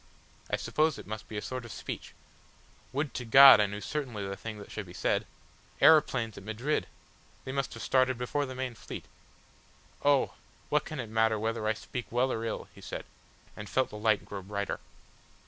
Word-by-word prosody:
"I - - +2
suppose 155 0 +1
it - - -9
must 110 +1 -6
be 110 - -6
a 105 - -3
sort 130 -1 -4
of 120 - -9
speech. - - -7 0.8
Would 145 +1 -2
to 125 - -4
God 135 +2 +10
I 105 - +4
knew 105 +1 -5
certainly 120 -10 -3
the 100 - -4
thing 110 +1 -7
that 100 - -11
should 110 -3 -5
be 90 - -11
said! - - 0 0.5
Aeroplanes 130 -8 +5
at - - -14
Madrid! 115 +8 -1 0.6
They 130 - -4
must 135 0 -2
have - - -7
started 130 -1 +3
before 135 +4 -1
the 130 - -7
main 130 -1 -3
fleet. 110 - -8 1.0
"Oh! 145 -1 +3 0.4
what 150 0 +2
can 155 - -6
it 120 - -3
matter 110 0 +3
whether 110 0 -1
I 110 - +3
speak 120 +2 -6
well 125 +2 +2
or 115 - -2
ill?" 115 - -3
he - - -14
said, - - -6 0.5
and 105 0 -8
felt 130 - +1
the - - -8
light 110 0 +2
grow 100 -1 -6
brighter. 100 +1 -3
115 Hz, 200 wpm, -30 LUFS, 105-130 Hz, 1.0 s, God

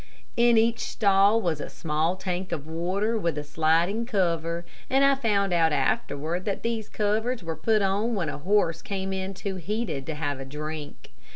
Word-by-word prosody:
In 235 -1 +5
each 230 +1 +3
stall 200 +1 +3
was 165 -8 -1
a - - -5
small 160 +2 -1
tank 185 -1 -4
of 155 -4 -3
water 185 +8 -1
with 170 -6 -1
a 150 - -2
sliding 165 +9 +1
cover, 170 -5 0 0.2
and 270 +1 +4
I 275 - +6
found 205 -8 +1
out 165 -2 +4
afterward 150 +4 0
that 200 -2 -2
these 230 -2 -2
covers 220 +2 0
were 165 -1 -3
put 215 +6 +2
on 205 +5 +1
when 180 -6 -1
a 150 - -4
horse 165 -1 +2
came 195 -1 -3
in 190 0 -3
too 195 0 -4
heated 185 - -3
to 160 - -3
have 145 -3 -2
a - - -5
drink. 150 +2 -7
185 Hz, 185 wpm, -26 LUFS, 160-215 Hz, 0.2 s, I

